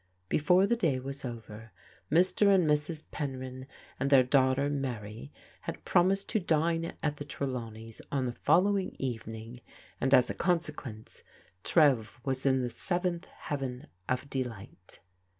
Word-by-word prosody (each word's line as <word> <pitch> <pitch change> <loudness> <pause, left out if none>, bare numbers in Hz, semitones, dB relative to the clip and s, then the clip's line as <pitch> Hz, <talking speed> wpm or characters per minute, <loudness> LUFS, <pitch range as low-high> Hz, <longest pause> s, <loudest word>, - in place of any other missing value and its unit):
Before 180 +6 +4
the 235 - +2
day 165 - +1
was 135 +1 -6
over 115 -2 -8 0.4
Mr. 185 +5 +4
and 190 -5 +5
Mrs. 150 +1 0
Penryn 130 -2 -5 0.3
and 140 - 0
their 135 -2 +7
daughter 130 +1 +3
Mary 115 - -4 0.4
had - - -5
promised 195 +3 +3
to 220 - +1
dine 165 -1 +1
at 150 -1 0
the 145 - -5
Tre 145 -1 -4
lawneys' 115 -3 -6
on 135 -2 0
the 125 - -1
following 185 +8 +2
evening, 115 -1 -5 0.4
and 130 - +1
as 125 -2 +6
a - - -3
consequence 150 - -2 0.4
Trev 135 -10 +3
was 135 0 0
in 130 -1 +3
the 120 - -1
seventh 175 +1 -2
heaven 135 -3 -5 0.2
of 130 +2 -1
delight. 115 -9 -6
135 Hz, 145 wpm, -30 LUFS, 125-165 Hz, 0.4 s, their